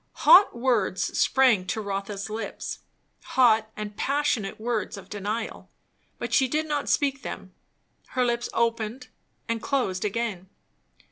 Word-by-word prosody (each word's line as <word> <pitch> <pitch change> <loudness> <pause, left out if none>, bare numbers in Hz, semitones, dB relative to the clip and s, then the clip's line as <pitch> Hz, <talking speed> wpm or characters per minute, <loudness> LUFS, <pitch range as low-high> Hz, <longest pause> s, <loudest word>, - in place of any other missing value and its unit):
Hot 375 -8 +8
words 220 -8 0
sprang 245 -9 +3
to 190 - -2
Rotha's 200 0 -4
lips, 220 +1 -5 0.6
hot 220 -4 +5
and 210 -1 -5
passionate 270 -8 -1
words 220 -3 -2
of 195 - -11
denial; 210 +2 -4 0.5
but - - -5
she 265 - +4
did 305 +4 -1
not 295 -2 -2
speak 275 -2 +1
them; - - -7 0.6
her 250 - +4
lips 240 0 -1
opened 230 +2 -1 0.4
and 230 -1 -2
closed 220 -10 -1
again. 210 -3 -3
230 Hz, 130 wpm, -26 LUFS, 205-255 Hz, 0.6 s, Hot